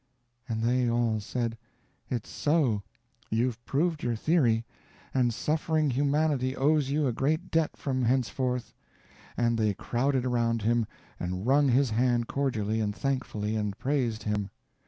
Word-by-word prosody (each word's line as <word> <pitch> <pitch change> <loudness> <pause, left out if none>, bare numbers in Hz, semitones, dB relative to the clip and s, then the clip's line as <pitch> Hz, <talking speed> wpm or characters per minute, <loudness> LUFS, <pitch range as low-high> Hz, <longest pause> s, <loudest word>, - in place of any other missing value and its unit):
And 110 -1 -1
they 125 +1 +2
all 115 -2 +1
said: 115 +1 -3 0.5
"It's 120 -4 -3
so 145 -9 +1 0.5
you've 115 +1 0
proved 160 +2 0
your 120 -1 0
theory, 115 -4 +2 0.5
and 125 -2 +3
suffering 155 +3 0
humanity 140 -1 +1
owes 145 0 +2
you 145 +1 +1
a 125 - +1
great 155 +9 -1
debt 165 -1 +1
from 130 -3 -1
henceforth," 125 0 0 0.6
and 115 -1 +2
they 105 -2 +2
crowded 130 +4 0
around 115 -3 +1
him, 115 0 +2 0.3
and 90 +3 -3
wrung 140 +3 +4
his 130 0 +3
hand 120 +1 +2
cordially 110 -6 -1
and 105 -2 -1
thankfully, 110 -6 -2
and 105 -2 -2
praised 125 -6 -1
him. 105 -2 -1
125 Hz, 140 wpm, -28 LUFS, 115-140 Hz, 0.6 s, wrung